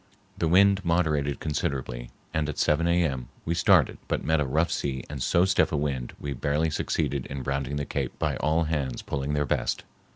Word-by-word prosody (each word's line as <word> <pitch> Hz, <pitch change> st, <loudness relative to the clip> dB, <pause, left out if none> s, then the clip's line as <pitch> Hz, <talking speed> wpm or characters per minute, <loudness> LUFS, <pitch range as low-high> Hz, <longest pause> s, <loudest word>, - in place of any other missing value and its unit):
The 85 Hz, -, 0 dB
wind 100 Hz, +3 st, +5 dB
moderated 80 Hz, -5 st, +1 dB
considerably, 65 Hz, -5 st, -3 dB, 0.2 s
and 75 Hz, -1 st, 0 dB
at 75 Hz, -, -5 dB
7 80 Hz, +3 st, +2 dB
A.M. 80 Hz, -8 st, +1 dB, 0.2 s
we 85 Hz, -, 0 dB
started 85 Hz, -, +4 dB
but -, -, -1 dB
met 80 Hz, 0 st, +2 dB
a 70 Hz, -, 0 dB
rough 80 Hz, +6 st, +1 dB
sea 65 Hz, -2 st, -2 dB
and 70 Hz, -3 st, -5 dB
so 85 Hz, +8 st, +3 dB
stiff 95 Hz, 0 st, +2 dB
a 75 Hz, -, 0 dB
wind 70 Hz, -4 st, -2 dB
we 70 Hz, -1 st, -4 dB
barely 75 Hz, +5 st, 0 dB
succeeded 70 Hz, -2 st, -1 dB
in 70 Hz, -1 st, -5 dB
rounding 70 Hz, +1 st, -2 dB
the 70 Hz, 0 st, -2 dB
cape -, -, -3 dB
by -, -, 0 dB
all 80 Hz, +3 st, +2 dB
hands 75 Hz, -6 st, -2 dB
pulling 70 Hz, +1 st, -2 dB
their 75 Hz, 0 st, +1 dB
best. -, -, -1 dB
75 Hz, 195 wpm, -27 LUFS, 70-80 Hz, 0.2 s, wind